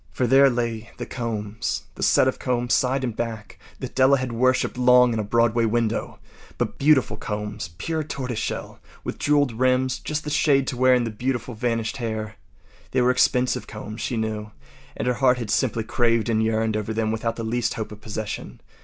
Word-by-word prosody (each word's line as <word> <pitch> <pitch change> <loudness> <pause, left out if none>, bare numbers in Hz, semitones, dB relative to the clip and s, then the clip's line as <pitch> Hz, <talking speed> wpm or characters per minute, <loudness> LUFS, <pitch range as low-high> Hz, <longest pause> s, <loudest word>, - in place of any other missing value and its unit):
For 125 - -1
there 135 +3 +6
lay 120 -2 -2
The 120 - -4
Combs—the 110 -3 -4
set - - +4
of - - -1
combs, 120 -1 0
side 130 +1 +2
and 120 -4 -2
back, 115 -3 -5 0.2
that - - -7
Della 135 +1 +5
had 130 -1 -3
worshipped 130 +2 +1
long 125 -1 +5
in 110 - -1
a - - 0
Broadway 115 +2 +2
window. 115 0 -1 0.6
Beautiful 135 -6 +3
combs, 105 -2 -5
pure 160 - -2
tortoise 130 -5 -4
shell, - - -4 0.2
with - - -5
jewelled 145 -3 +3
rims—just 130 +4 +1
the 150 - -4
shade 145 -2 +3
to - - -4
wear 130 +1 +5
in 125 - +2
the 115 - -3
beautiful 120 +2 -3
vanished 115 +2 -2
hair. 110 -3 -4 0.5
They - - +1
were 125 - +4
expensive 125 0 +2
combs, 105 +1 -7
she 120 - -2
knew, 110 -1 -3 0.5
and - - -2
her 125 - +3
heart 125 0 +3
had 115 -4 -4
simply 115 -4 +1
craved 115 -1 +1
and 110 -1 +2
yearned 110 0 +1
over 110 +1 -2
them 110 -1 0
without 115 +1 -2
the 115 - -5
least 115 +1 -1
hope 110 -1 -5
of 105 0 -10
possession. 110 -1 -6
120 Hz, 190 wpm, -24 LUFS, 110-130 Hz, 0.6 s, there